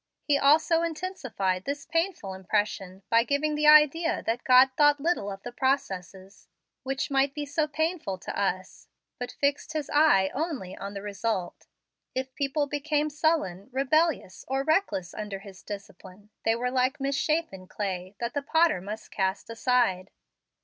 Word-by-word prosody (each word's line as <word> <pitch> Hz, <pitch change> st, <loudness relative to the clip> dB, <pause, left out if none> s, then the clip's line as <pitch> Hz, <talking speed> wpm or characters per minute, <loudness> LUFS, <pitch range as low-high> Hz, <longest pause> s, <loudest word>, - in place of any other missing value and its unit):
He 290 Hz, -, +2 dB
also 310 Hz, +4 st, +4 dB
intensified 295 Hz, -, -2 dB
this 285 Hz, +1 st, -4 dB
painful 330 Hz, -, -1 dB
impression 190 Hz, 0 st, -2 dB
by 230 Hz, 0 st, +5 dB
giving 285 Hz, +4 st, 0 dB
the 300 Hz, 0 st, +1 dB
idea 305 Hz, +2 st, +5 dB
that 230 Hz, +2 st, -1 dB
God 255 Hz, +1 st, +6 dB
thought 295 Hz, 0 st, +4 dB
little 300 Hz, -, 0 dB
of 195 Hz, 0 st, -9 dB
the 245 Hz, -, -6 dB
processes, 195 Hz, -8 st, -3 dB, 0.3 s
which 270 Hz, +1 st, -3 dB
might 275 Hz, 0 st, +2 dB
be 295 Hz, -1 st, -3 dB
so 300 Hz, +2 st, 0 dB
painful 315 Hz, -, -2 dB
to 185 Hz, -, -7 dB
us, 185 Hz, -2 st, -3 dB, 0.3 s
but 245 Hz, -, -4 dB
fixed 285 Hz, +2 st, -1 dB
His 305 Hz, -3 st, -3 dB
eye 290 Hz, -11 st, +4 dB
only 275 Hz, -, -3 dB
on 200 Hz, +1 st, -7 dB
the 200 Hz, -, -6 dB
result. 200 Hz, -2 st, -3 dB, 0.5 s
If 260 Hz, 0 st, -3 dB
people 280 Hz, +2 st, 0 dB
became 295 Hz, +1 st, -1 dB
sullen, 285 Hz, -, 0 dB
rebellious, 275 Hz, -, +1 dB
or 270 Hz, +1 st, 0 dB
reckless 310 Hz, -, 0 dB
under 210 Hz, -2 st, -5 dB
His 195 Hz, -1 st, -13 dB
discipline, 200 Hz, 0 st, -10 dB
they 225 Hz, -, +3 dB
were 250 Hz, +2 st, -2 dB
like 255 Hz, +2 st, +1 dB
misshappen 275 Hz, -, -1 dB
clay, 190 Hz, -1 st, -4 dB
that 235 Hz, 0 st, -3 dB
the 285 Hz, -, -1 dB
potter 320 Hz, -, +2 dB
must 210 Hz, +3 st, -7 dB
cast 190 Hz, +3 st, -2 dB
aside. 230 Hz, -6 st, +1 dB
260 Hz, 155 wpm, -27 LUFS, 195-300 Hz, 0.5 s, God